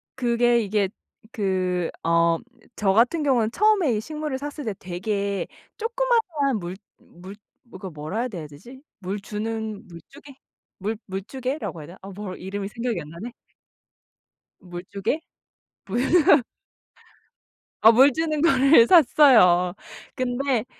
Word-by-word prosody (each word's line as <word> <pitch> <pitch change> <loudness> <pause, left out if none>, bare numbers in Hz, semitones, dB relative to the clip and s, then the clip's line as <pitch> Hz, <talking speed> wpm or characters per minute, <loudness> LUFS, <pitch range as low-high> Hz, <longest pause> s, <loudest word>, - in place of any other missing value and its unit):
그게 240 -1 +2
이게 205 -2 0 0.4
그 185 -3 -1
어 170 0 +3 0.4
저 195 -2 +1
같은 245 - +3
경우는 240 -6 +2
처음에 400 - +3
이 210 - -2
식물을 300 0 -4
샀을 290 0 -7
때 215 - -2
되게 200 +1 -3 0.3
조그마한 450 - 0
물 175 0 -6 0.2
물 185 +3 -13 0.5
그 190 - -6
뭐라 155 +5 -6
해야 250 - 0
돼야 170 -8 -7
되지? 240 - -14 0.2
물 195 +2 -4
주는 220 +1 -5
물주개? 175 - -14 0.5
물 210 +3 -3
물주개라고 235 - -5
해야 145 - -10
되나? 175 +3 -13
아 195 - -10
뭐 200 -3 -6
이름이 195 +2 -5
생각이 235 -2 -3
안 150 - -11
나네. 205 +10 -8 1.3
물주개? 190 - -4 0.7
뭐야. 270 - +4 1.4
아 225 - +8
물 265 +5 +6
주는 310 -2 -1
거를 275 -5 +5
샀어요. 230 - +5 0.4
근데 255 -2 -1
220 Hz, 235 characters per minute, -24 LUFS, 190-275 Hz, 1.4 s, 아